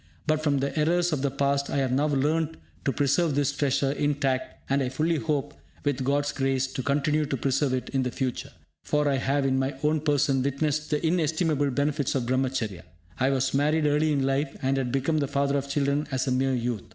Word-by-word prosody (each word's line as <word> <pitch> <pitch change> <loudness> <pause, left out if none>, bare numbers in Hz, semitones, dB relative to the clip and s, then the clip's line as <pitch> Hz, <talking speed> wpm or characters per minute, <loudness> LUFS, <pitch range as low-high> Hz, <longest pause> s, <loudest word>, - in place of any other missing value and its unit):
But 155 0 +1
from 145 -2 +2
the 140 - -2
errors 175 +2 +2
of 140 - -1
the 140 - +1
past 140 +1 0
I - - -1
have 135 -2 +1
now 140 +4 +2
learnt 155 +3 0 0.3
to 140 - +2
preserve 145 +4 +1
this 145 0 +2
treasure 140 -1 +1
in 145 0 0
tact, 135 -2 -2
and 140 +1 +1
I 130 - 0
fully 155 +5 0
hope, 150 -2 -2 0.3
with 140 -3 0
God's 145 +2 +1
grace, 135 -1 0
to 130 - -5
continue 145 +3 +1
to 135 - -2
preserve 135 +1 +1
it 125 - -4
in 135 - 0
the 125 - -1
future; 130 0 -3 0.3
for 150 0 +1
I 140 -1 +2
have 135 +1 0
in 130 -1 +2
my 135 +1 -1
own 155 +1 +2
person, 145 -3 +2
witnessed 145 +2 -1
the 150 +1 0
inestimable 160 -3 +1
benefits 140 +1 0
of 130 -3 0
Brahmacharya. 125 -6 -1 0.4
I 130 - +3
was 135 -1 0
married 150 +3 +2
early 150 +1 +2
in 140 -2 +1
life, 135 +1 -1
and 135 +1 +1
had 130 -2 -1
become 140 +4 +1
the 140 - 0
father 140 0 0
of 140 0 -2
children 140 +1 0
as 130 -1 0
a 130 - -1
mere 130 +1 +1
youth. 120 -3 -2
140 Hz, 220 wpm, -26 LUFS, 135-150 Hz, 0.4 s, I